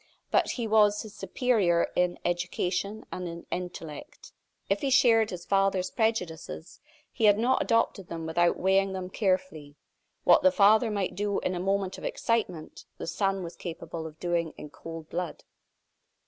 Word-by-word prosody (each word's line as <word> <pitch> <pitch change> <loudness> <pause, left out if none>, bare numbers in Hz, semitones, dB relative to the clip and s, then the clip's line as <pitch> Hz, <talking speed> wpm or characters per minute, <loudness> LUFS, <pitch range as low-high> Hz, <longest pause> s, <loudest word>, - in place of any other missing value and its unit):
But - - +3
he 240 - -3
was 210 -1 +4
his 215 -2 -11
superior 200 -10 +1
in 180 0 +1
education 180 +4 -2
and 180 -1 -4
in 170 0 -8
intellect. 175 -4 -7 0.3
If 195 +1 0
he 275 - 0
shared 230 -4 +5
his 180 -2 -7
father's 195 -2 +1
prejudices, 180 -7 -2 0.3
he 225 - 0
had 205 -1 +6
not 250 +4 +2
adopted 230 -5 +1
them 165 -1 -6
without 170 +2 +2
weighing 195 +1 +2
them 185 -1 -5
carefully. 185 -8 -1 0.5
What - - +6
the 280 - +5
father 220 -1 +5
might 200 -3 -1
do 205 +1 -1
in 185 - -1
a 180 - -3
moment 195 0 -1
of - - -13
excitement, 230 - -2
the - - -5
son 195 +3 -1
was 170 - -7
capable 165 -1 -6
of 155 0 -13
doing 170 -2 -1
in 150 - -9
cold 165 0 -9
blood. 175 0 -4
190 Hz, 160 wpm, -28 LUFS, 170-210 Hz, 0.5 s, had